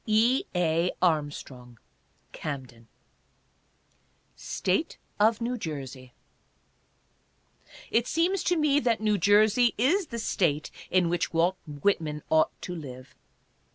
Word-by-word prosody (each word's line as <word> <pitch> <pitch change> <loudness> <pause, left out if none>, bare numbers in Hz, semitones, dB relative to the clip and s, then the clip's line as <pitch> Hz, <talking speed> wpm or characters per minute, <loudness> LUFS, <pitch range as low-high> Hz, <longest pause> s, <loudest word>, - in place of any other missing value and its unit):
E. 225 +4 +3
A. 170 0 +2
ARMSTRONG: 145 -7 -2 0.5
Camden. 130 -6 -7 1.5
STATE 195 - -2 0.2
OF 220 +1 +4
NEW 245 +2 -2
JERSEY. 135 - -7 1.8
It 235 +2 +2
seems 350 +3 +1
to 355 - +2
me 295 -2 +3
that 235 -5 +1
New 210 -2 +1
Jersey 215 +5 +4
is 325 - +2
the 235 - -6
State 165 -9 0 0.2
in 185 -2 +3
which 175 0 -1
Walt 175 +3 +2
Whitman 150 0 -1
ought 160 0 +2
to 180 - -5
live. 130 -6 -9
180 Hz, 110 wpm, -27 LUFS, 150-235 Hz, 1.8 s, OF